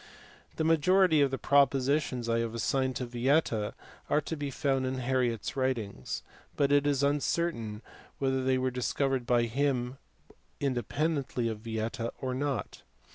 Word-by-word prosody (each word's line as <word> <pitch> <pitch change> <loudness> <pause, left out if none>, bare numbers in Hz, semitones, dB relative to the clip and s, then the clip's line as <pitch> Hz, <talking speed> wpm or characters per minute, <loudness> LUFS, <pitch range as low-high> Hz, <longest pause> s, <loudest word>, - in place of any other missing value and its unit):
The - - -1
majority 165 +1 +4
of 140 - +4
the 135 - -2
propositions 140 -2 +2
I 115 0 +2
have 115 0 -2
assigned 130 +3 0
to 125 - -2
Vieta 120 -3 +1 0.3
are 150 - +3
to 160 - -4
be 145 -2 -3
found 135 -1 0
in 130 - -2
Harriot 125 -3 0
s - - -4
writings, 115 - -2 0.3
but 140 -1 +2
it 145 0 +4
is 140 -1 +1
uncertain 140 -6 0 0.3
whether 130 -1 0
they 130 0 +2
were 130 0 0
discovered 130 0 -1
by 120 -1 +3
him 130 +1 -1 0.6
independently 135 0 -1
of 110 -2 -4
Vieta 115 +1 -3
or 130 -1 -2
not. 135 -6 -3
130 Hz, 150 wpm, -30 LUFS, 120-145 Hz, 0.6 s, majority